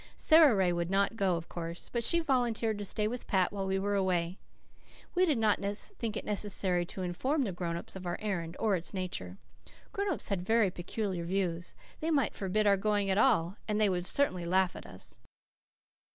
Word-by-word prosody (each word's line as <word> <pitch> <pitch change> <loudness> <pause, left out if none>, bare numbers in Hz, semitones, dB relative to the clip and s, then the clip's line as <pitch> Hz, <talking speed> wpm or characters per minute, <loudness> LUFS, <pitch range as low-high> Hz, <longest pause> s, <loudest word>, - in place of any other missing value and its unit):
Sara 315 -6 +6
Ray 185 -3 +2
would 170 0 -2
not 200 +3 +2
go, 195 -5 +2
of 165 0 -5
course, 170 0 -6
but 235 -1 +1
she 340 +8 +4
volunteered 235 -7 0
to 205 - -4
stay 210 +2 0
with 245 +3 -5
Pat 190 -1 +2
while 195 -1 -3
we 190 0 +1
were 200 +1 -1
away. 185 -2 0 0.7
We 370 +1 +3
did 300 -6 +2
not 215 -3 +2
think 205 +2 -3
it - - -5
necessary 190 -4 0
to 190 - -5
inform 260 - 0
the 210 - -2
grown 170 -1 -3
ups 170 - -8
of 185 -1 -6
our 175 - -2
errand, 175 -5 -3
or 215 -3 +2
its 180 +3 -3
nature. 100 - -4 0.5
Grown 400 +1 -1
ups 315 - -3
had 190 -3 -2
such 220 -5 +3
peculiar 185 0 -3
views. 175 -2 -2 0.2
They 320 - -2
might 290 -4 +2
forbid 205 +2 0
our 200 -1 +5
going 205 -1 +1
at 190 - +2
all 210 -6 +3
and 210 -1 0
they 210 -2 +4
would 180 -1 -1
certainly 185 -11 0
laugh 185 +1 +2
at - - -9
us. 95 - -9
195 Hz, 205 wpm, -31 LUFS, 180-220 Hz, 0.7 s, Sara